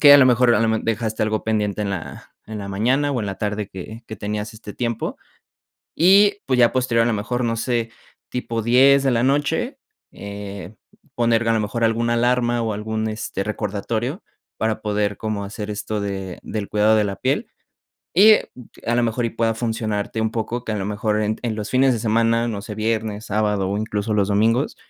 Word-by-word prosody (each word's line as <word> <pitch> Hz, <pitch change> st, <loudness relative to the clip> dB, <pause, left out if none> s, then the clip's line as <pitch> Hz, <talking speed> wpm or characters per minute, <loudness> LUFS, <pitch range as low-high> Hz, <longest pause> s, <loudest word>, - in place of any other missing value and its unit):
que 145 Hz, -1 st, +9 dB
a 145 Hz, -, +10 dB
lo 135 Hz, -, +7 dB
mejor, 125 Hz, -1 st, +4 dB
a -, -, +2 dB
lo 115 Hz, -, +2 dB
me 110 Hz, 0 st, +2 dB
dejaste 110 Hz, -1 st, -1 dB
algo 110 Hz, 0 st, -1 dB
pendiente 105 Hz, -2 st, 0 dB
en 100 Hz, -, -2 dB
la 95 Hz, -4 st, -7 dB
en 110 Hz, -1 st, -6 dB
la 100 Hz, -, -6 dB
mañana, 130 Hz, +9 st, +1 dB
o 125 Hz, -, -1 dB
en 105 Hz, -, -3 dB
la 100 Hz, -1 st, -4 dB
tarde 105 Hz, -1 st, -2 dB
que 110 Hz, +5 st, -9 dB
que 110 Hz, -, -7 dB
tenías 105 Hz, +1 st, -4 dB
este 105 Hz, -2 st, -9 dB
tiempo. 115 Hz, -2 st, -2 dB, 0.8 s
Y, 200 Hz, +4 st, +5 dB
pues, 130 Hz, -2 st, +1 dB
ya 120 Hz, -1 st, +5 dB
posterior, 120 Hz, -3 st, +2 dB
a -, -, 0 dB
lo 115 Hz, -, +1 dB
mejor, 115 Hz, +4 st, -2 dB
no 115 Hz, -1 st, 0 dB
sé, 115 Hz, 0 st, -1 dB, 0.4 s
tipo 115 Hz, -2 st, -3 dB
10 135 Hz, +4 st, +5 dB
de 135 Hz, -, +2 dB
la 120 Hz, -1 st, +2 dB
noche, 145 Hz, -, 0 dB, 0.3 s
eh, 100 Hz, -1 st, -8 dB, 0.4 s
poner 115 Hz, -1 st, +2 dB
a -, -, +4 dB
lo 110 Hz, -, +1 dB
mejor 110 Hz, +3 st, -1 dB
alguna 115 Hz, +1 st, +1 dB
alarma, 120 Hz, 0 st, +2 dB
o 110 Hz, -1 st, -1 dB
algún, 110 Hz, +1 st, -2 dB
este, 110 Hz, -3 st, -4 dB
recordatorio 110 Hz, -, -3 dB, 0.4 s
para 110 Hz, -1 st, -1 dB
poder 105 Hz, -1 st, 0 dB
como 110 Hz, -2 st, -3 dB
hacer 105 Hz, +1 st, -6 dB
esto 105 Hz, +1 st, -3 dB
de 95 Hz, -2 st, -4 dB
del 105 Hz, -2 st, -4 dB
cuidado 105 Hz, +1 st, +3 dB
de 105 Hz, -, +3 dB
la 100 Hz, -1 st, -3 dB
piel -, -, 0 dB, 0.7 s
y, 200 Hz, +6 st, +8 dB
eh, 215 Hz, -, +4 dB, 0.4 s
a 120 Hz, -, +2 dB
lo 120 Hz, -, +3 dB
mejor 115 Hz, +1 st, -1 dB
y -, -, -3 dB
pueda 115 Hz, 0 st, 0 dB
funcionarte 110 Hz, -2 st, -2 dB
un 110 Hz, -, 0 dB
poco, 120 Hz, +2 st, -3 dB
que 110 Hz, -, -3 dB
a -, -, -1 dB
lo 95 Hz, -, -3 dB
mejor 105 Hz, +1 st, -1 dB
en 110 Hz, +1 st, 0 dB
en 120 Hz, -3 st, -1 dB
los 105 Hz, -1 st, -5 dB
fines 130 Hz, +1 st, +4 dB
de 115 Hz, -, -2 dB
semana, 115 Hz, +1 st, +2 dB
no 100 Hz, -3 st, -4 dB
sé, 105 Hz, -, -7 dB
viernes, 110 Hz, -1 st, -2 dB
sábado, 105 Hz, -2 st, 0 dB
o 100 Hz, -, -1 dB
incluso, 105 Hz, 0 st, -2 dB
los 100 Hz, -2 st, +2 dB
domingos, 115 Hz, +6 st, +2 dB
110 Hz, 210 wpm, -22 LUFS, 105-120 Hz, 0.8 s, a